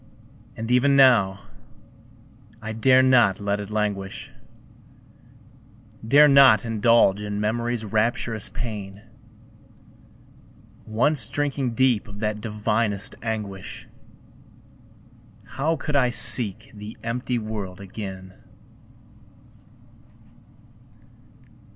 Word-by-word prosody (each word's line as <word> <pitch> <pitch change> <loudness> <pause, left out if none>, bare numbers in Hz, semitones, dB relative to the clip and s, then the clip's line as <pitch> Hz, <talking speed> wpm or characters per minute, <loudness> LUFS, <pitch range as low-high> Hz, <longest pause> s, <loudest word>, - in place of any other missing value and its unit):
And 115 +2 -5
even 135 +3 +3
now, 115 -8 +4 1.2
I 110 -1 -6
dare 130 +3 +4
not 120 -7 +3
let 100 0 -2
it 100 -1 -7
languish, 105 +3 -4 1.7
Dare 145 +6 +5
not 135 -6 +6
indulge 115 -2 +2
in 105 0 -4
Memory's 115 +2 -2
rapturous 110 +1 -1
pain; 105 -4 -7 1.8
Once 120 +3 0
drinking 135 -2 -3
deep 125 -4 +1
of 105 0 -11
that 105 -1 -3
divinest 105 -1 -2
anguish, 105 -4 -6 1.6
How 155 +4 -2
could 150 0 -5
I 130 -3 +3
seek 115 0 +3
the 105 +1 -10
empty 125 +2 -3
world 105 -4 -6
again? 95 -1 -9
110 Hz, 85 wpm, -23 LUFS, 105-125 Hz, 1.8 s, not